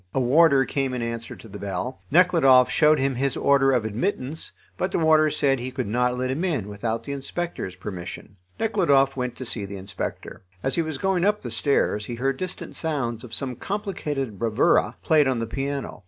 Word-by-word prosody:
A -, -, +3 dB
warder 140 Hz, +1 st, +5 dB
came 135 Hz, -2 st, -1 dB
in 120 Hz, -, -3 dB
answer 115 Hz, 0 st, -5 dB
to -, -, -13 dB
the 100 Hz, -, -9 dB
bell. 100 Hz, +6 st, -4 dB
Nekhludoff 145 Hz, -7 st, +5 dB
showed 155 Hz, 0 st, +4 dB
him 135 Hz, 0 st, +1 dB
his 135 Hz, +1 st, -1 dB
order 140 Hz, -1 st, +4 dB
of 125 Hz, -4 st, +1 dB
admittance, 135 Hz, -, -3 dB, 0.2 s
but 185 Hz, -, -2 dB
the -, -, 0 dB
warder 155 Hz, -1 st, +4 dB
said 140 Hz, -3 st, +1 dB
he 125 Hz, +2 st, -4 dB
could 130 Hz, -1 st, -3 dB
not 125 Hz, +3 st, 0 dB
let 130 Hz, +1 st, -1 dB
him 150 Hz, +7 st, -2 dB
in 145 Hz, -, -1 dB
without 110 Hz, +2 st, -3 dB
the 140 Hz, -, -6 dB
inspector's 140 Hz, -, -4 dB
permission. 95 Hz, +1 st, -8 dB, 0.2 s
Nekhludoff 140 Hz, -12 st, +3 dB
went 125 Hz, -2 st, -3 dB
to 130 Hz, -, -7 dB
see 115 Hz, -3 st, 0 dB
the 100 Hz, 0 st, -6 dB
inspector. 95 Hz, 0 st, -6 dB, 0.2 s
As 135 Hz, -, 0 dB
he 170 Hz, -, +2 dB
was 155 Hz, -3 st, -4 dB
going 190 Hz, +2 st, 0 dB
up 210 Hz, +2 st, +1 dB
the 120 Hz, -, -5 dB
stairs 110 Hz, -3 st, +1 dB
he 120 Hz, -, -4 dB
heard 135 Hz, +3 st, -1 dB
distant 185 Hz, -1 st, -6 dB
sounds 135 Hz, -8 st, -2 dB
of 120 Hz, -, -10 dB
some 130 Hz, +1 st, -2 dB
complicated 150 Hz, -, -4 dB
bravura, 115 Hz, -2 st, +2 dB
played 150 Hz, -3 st, +4 dB
on 130 Hz, -2 st, +1 dB
the 115 Hz, -, -2 dB
piano. 135 Hz, +3 st, -4 dB
135 Hz, 200 wpm, -24 LUFS, 115-155 Hz, 0.2 s, warder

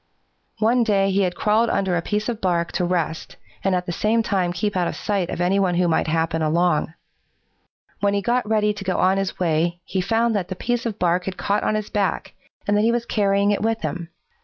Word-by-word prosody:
"One 235 Hz, +3 st, +3 dB
day 195 Hz, -3 st, +2 dB
he 195 Hz, +1 st, +2 dB
had 180 Hz, -2 st, 0 dB
crawled 220 Hz, +2 st, +2 dB
under 190 Hz, -2 st, 0 dB
a 170 Hz, -, 0 dB
piece 210 Hz, +4 st, -2 dB
of 235 Hz, -3 st, -3 dB
bark 170 Hz, -2 st, 0 dB
to 180 Hz, -, -1 dB
rest 170 Hz, -3 st, -2 dB, 0.3 s
and 195 Hz, -1 st, +2 dB
at 180 Hz, 0 st, -1 dB
the 175 Hz, -, -3 dB
same 220 Hz, +6 st, +1 dB
time 185 Hz, -4 st, 0 dB
keep 195 Hz, +4 st, -2 dB
out 180 Hz, -2 st, +1 dB
of -, -, -4 dB
sight 195 Hz, -4 st, -1 dB
of -, -, -4 dB
any 180 Hz, +2 st, +2 dB
who 180 Hz, -2 st, +2 dB
might 160 Hz, -, +1 dB
happen 160 Hz, 0 st, 0 dB
along. 160 Hz, 0 st, +1 dB, 1.0 s
When 200 Hz, 0 st, +1 dB
he 200 Hz, -, 0 dB
got 240 Hz, -1 st, 0 dB
ready 210 Hz, -1 st, +2 dB
to 205 Hz, -1 st, -7 dB
go 185 Hz, -2 st, -1 dB
on 190 Hz, +1 st, +3 dB
his 195 Hz, -1 st, -3 dB
way, 170 Hz, 0 st, 0 dB
he 190 Hz, -, -1 dB
found 225 Hz, +4 st, +1 dB
that 190 Hz, -4 st, -1 dB
the 185 Hz, -, -5 dB
piece 240 Hz, +4 st, -1 dB
of 215 Hz, -, -4 dB
bark 180 Hz, 0 st, +1 dB
had 190 Hz, -1 st, -4 dB
caught 205 Hz, +1 st, 0 dB
on 215 Hz, -, 0 dB
his 215 Hz, -1 st, -3 dB
back, 200 Hz, -2 st, -1 dB, 0.3 s
and 205 Hz, -, +2 dB
that 210 Hz, -, +3 dB
he 225 Hz, +2 st, +3 dB
was 235 Hz, 0 st, -1 dB
carrying 200 Hz, -2 st, +2 dB
it 205 Hz, -, 0 dB
with 225 Hz, 0 st, 0 dB
him. 170 Hz, -2 st, -4 dB
195 Hz, 235 wpm, -22 LUFS, 175-210 Hz, 1.0 s, One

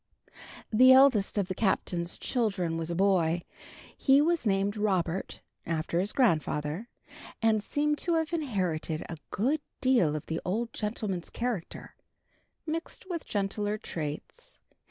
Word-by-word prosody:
III. -, -, -36 dB, 0.4 s
The 255 Hz, +4 st, +8 dB
eldest 260 Hz, -7 st, +5 dB
of 200 Hz, -3 st, +1 dB
the 190 Hz, -, -2 dB
Captain's 175 Hz, -4 st, 0 dB
children 195 Hz, -9 st, 0 dB
was 165 Hz, 0 st, -3 dB
a 170 Hz, -, -2 dB
boy. 175 Hz, -3 st, +2 dB, 0.5 s
He 270 Hz, +1 st, +4 dB
was 320 Hz, -3 st, +2 dB
named 195 Hz, +1 st, +1 dB
Robert, 190 Hz, -4 st, -1 dB, 0.2 s
after 165 Hz, +1 st, -1 dB
his 200 Hz, +3 st, 0 dB
grandfather, 165 Hz, -, 0 dB, 0.5 s
and 225 Hz, -2 st, +3 dB
seemed 295 Hz, +5 st, 0 dB
to 340 Hz, -2 st, 0 dB
have 320 Hz, +1 st, -1 dB
inherited 185 Hz, -, -1 dB
a 165 Hz, -, -6 dB
good 270 Hz, +9 st, 0 dB, 0.2 s
deal 240 Hz, -, +3 dB
of 150 Hz, -, -5 dB
the 160 Hz, 0 st, -3 dB
old 225 Hz, +5 st, -2 dB
gentleman's 210 Hz, -5 st, -3 dB
character, 235 Hz, -8 st, -4 dB, 0.7 s
mixed 330 Hz, +3 st, -5 dB
with 335 Hz, -2 st, -4 dB
gentler 205 Hz, +1 st, -1 dB
traits. 155 Hz, -7 st, -6 dB
205 Hz, 135 wpm, -29 LUFS, 170-250 Hz, 0.7 s, The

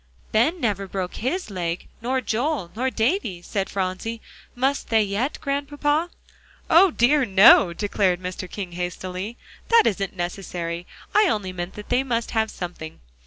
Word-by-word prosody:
"Ben 265 Hz, +12 st, +2 dB
never 200 Hz, -, -1 dB
broke 185 Hz, -1 st, -4 dB
his 285 Hz, -, -2 dB
leg, 175 Hz, -2 st, -3 dB
nor 255 Hz, +3 st, 0 dB
Joel, 240 Hz, -, -1 dB
nor 255 Hz, +3 st, 0 dB
Davie," 225 Hz, -, -1 dB
said 195 Hz, +2 st, -2 dB
Phronsie. 195 Hz, +4 st, -3 dB, 0.4 s
"Must 270 Hz, +3 st, 0 dB
they 225 Hz, -1 st, +4 dB
yet, 210 Hz, +8 st, -1 dB
Grandpapa?" 290 Hz, +3 st, 0 dB, 0.6 s
"O 365 Hz, +4 st, +7 dB
dear, 285 Hz, 0 st, +3 dB
no," 195 Hz, -4 st, +7 dB
declared 190 Hz, -1 st, 0 dB
Mr. 185 Hz, 0 st, -6 dB
King 190 Hz, -2 st, -6 dB
hastily; 180 Hz, +5 st, -5 dB, 0.3 s
"that 460 Hz, -1 st, +5 dB
isn't 195 Hz, -2 st, -1 dB
necessary. 175 Hz, -1 st, -4 dB, 0.3 s
I 420 Hz, -1 st, +5 dB
only 200 Hz, -, -1 dB
meant 175 Hz, +1 st, -5 dB
they 245 Hz, +1 st, +3 dB
must 235 Hz, -3 st, -2 dB
have 220 Hz, -1 st, +1 dB
something. 170 Hz, -, -7 dB
210 Hz, 145 wpm, -24 LUFS, 185-260 Hz, 0.6 s, O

